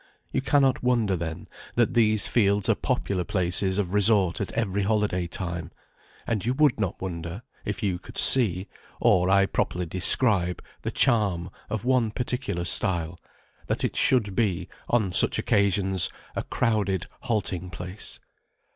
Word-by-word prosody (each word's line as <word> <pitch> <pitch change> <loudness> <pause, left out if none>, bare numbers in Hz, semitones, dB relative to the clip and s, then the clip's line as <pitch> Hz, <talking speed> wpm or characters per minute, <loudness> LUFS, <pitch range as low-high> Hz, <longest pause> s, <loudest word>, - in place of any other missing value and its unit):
You - - 0
cannot 135 -1 +2
wonder, 120 -6 +1
then, 85 0 -6 0.3
that 120 +1 +1
these 110 -3 +4
fields 100 -3 +2
are - - +4
popular 95 -3 -2
places 95 +1 -1
of 95 -3 -2
resort 100 -3 +3
at - - -4
every 100 +1 -1
holiday 100 -4 0
time; 85 -2 -5 0.6
and 110 -4 -2
you 125 +3 -1
would 145 -5 +2
not 95 -4 -3
wonder, 85 +2 -6 0.2
if 120 - -4
you 95 -3 -1
could - - -12
see, 100 -8 +6 0.3
or 90 0 +3
I 100 0 +4
properly 90 -1 -2
describe, 90 +1 +1 0.2
the - - -3
charm 100 -8 +1 0.2
of 110 +1 -4
one 125 -3 +2
particular 125 -6 -3
stile, 85 -2 0 0.5
that - - -2
it - - -3
should 105 -7 +2
be, 95 -6 -1 0.2
on 110 -6 +1
such 90 - +5
occasions, 95 -2 +2 0.3
a - - -1
crowded 100 -4 -1
halting 100 -7 -3
place. 90 +2 -6
100 Hz, 145 wpm, -25 LUFS, 90-110 Hz, 0.6 s, see